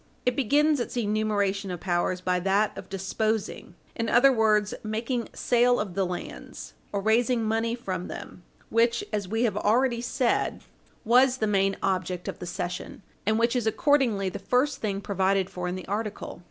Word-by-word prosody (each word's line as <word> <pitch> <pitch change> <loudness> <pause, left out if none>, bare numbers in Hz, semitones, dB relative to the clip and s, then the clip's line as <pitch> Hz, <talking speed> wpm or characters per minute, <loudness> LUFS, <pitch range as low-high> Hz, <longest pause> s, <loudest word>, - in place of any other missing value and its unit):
It 250 -1 +2
begins 290 +3 +3
its 245 - -4
enumeration 205 -3 0
of 180 -2 -4
powers 180 0 -1
by 180 0 +1
that 195 +3 +1
of - - -9
disposing, 215 +3 -2 0.2
in 230 -1 -2
other 270 +3 +6
words, 215 -3 +2
making 230 +2 -3
sale 245 0 +3
of 205 -4 -3
the 190 0 0
lands, 65 - -7 0.2
or 200 - -1
raising 230 +3 +2
money 225 +1 0
from 185 -7 -4
them, - - -8 0.3
which, 235 +1 +2
as 205 -3 -1
we 225 +4 0
have 220 -5 +1
already 235 +3 +2
said, 245 0 0 0.4
was 250 +3 +5
the 220 - 0
main 195 -2 +1
object 185 -1 -1
of - - -5
the 180 - -6
cession, 180 +2 -5 0.2
and 220 0 +3
which 235 +2 +2
is 240 -3 0
accordingly 235 -6 +2
the 185 - -4
first 255 +4 +1
thing 200 -2 -2
provided 195 -1 0
for 180 0 -4
in 180 - -2
the 185 - -8
article. 210 -3 -4
215 Hz, 175 wpm, -27 LUFS, 190-235 Hz, 0.4 s, other